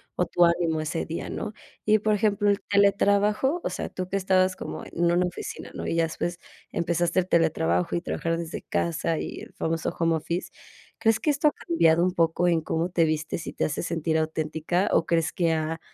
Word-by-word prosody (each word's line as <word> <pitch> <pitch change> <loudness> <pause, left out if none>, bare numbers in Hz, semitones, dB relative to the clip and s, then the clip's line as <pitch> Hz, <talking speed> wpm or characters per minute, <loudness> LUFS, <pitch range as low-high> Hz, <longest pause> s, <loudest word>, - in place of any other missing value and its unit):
o 180 - +1
tu 175 - +2
ánimo 170 -2 +1
ese 155 +2 -2
día, 165 - -4
¿no? 215 -1 -4 0.3
Y, 215 0 +5
por 215 +1 +1
ejemplo, 205 -1 +1
el 200 - +1
teletrabajo, 205 - +2
o - - -1
sea, - - -4
tú 185 -1 -5
que 195 - -2
estabas 185 -1 +2
como - - -6
en 170 0 0
una 180 +1 +3
oficina, 180 - -6
¿no?, - - -5
y - - -1
ya 165 - +3
después, 170 +2 -3 0.3
empezaste 170 +1 +1
el 180 - -1
teletrabajo 90 - +1
y 170 - +1
a - - -15
trabajar 165 -1 -2
desde 165 -1 -5
casa, 165 -1 -1
y - - -5
el - - -12
famoso 165 0 -2
home 165 -1 +2
office, 170 +3 -3 0.5
¿crees 225 -1 +3
que 300 - 0
esto 290 +2 +2
ha - - +4
cambiado 170 - +4
un 185 - +2
poco 170 +1 +2
en 165 -2 +3
cómo 165 +2 -1
te 170 -2 +2
vistes, 155 +1 -2
y - - -5
te - - 0
hace 150 - -2
sentir 165 -1 -1
auténtica? 160 +3 -1
¿O 165 - +3
crees 165 -2 +1
que, 170 -4 +1
ah, 160 +1 -2
170 Hz, 215 wpm, -26 LUFS, 165-190 Hz, 0.5 s, Y